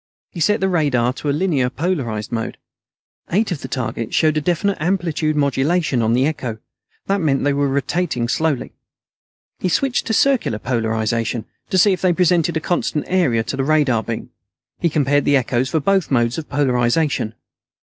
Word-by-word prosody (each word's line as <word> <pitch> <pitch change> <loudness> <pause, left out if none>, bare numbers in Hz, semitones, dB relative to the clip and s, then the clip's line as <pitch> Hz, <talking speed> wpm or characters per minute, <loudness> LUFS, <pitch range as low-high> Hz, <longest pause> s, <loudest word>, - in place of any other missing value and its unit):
He 175 - -8
set 210 +7 +2
the 190 - +2
radar 140 -9 +1
to 145 +2 -4
a - - +3
linearly 140 -6 0
polarized 130 - -2
mode. 115 -1 -3 0.7
Eight 205 +3 +1
of 160 - -3
the - - -5
targets 115 -3 -3
showed 155 -1 +3
a 155 - +1
definite 180 +5 0
amplitude 165 -3 0
modulation 140 0 +1
on 110 0 +2
the 130 +3 +3
echo. 130 -7 -3 0.5
That 195 0 0
meant 140 -4 +1
they 145 0 +2
were 140 0 +1
rotating 135 -2 -1
slowly. 155 +1 -1 0.9
He 185 - -1
switched 260 +8 0
to 225 - 0
circular 265 - +2
polarization, 115 0 -1 0.2
to 190 - +1
see 195 +2 +5
if 185 - -4
they 185 -2 +3
presented 170 -2 +2
a - - 0
constant 160 -2 -1
area 150 -12 +2
to 120 - -4
the 135 - -1
radar 140 -6 +2
beam. 115 +2 -6 0.5
He 170 - +1
compared 145 -2 +2
the 145 - +4
echoes 130 0 0
for 160 - +1
both 190 +3 +1
modes 120 0 +1
of 155 - -9
polarization. 125 -3 +1
145 Hz, 180 wpm, -20 LUFS, 125-175 Hz, 0.9 s, see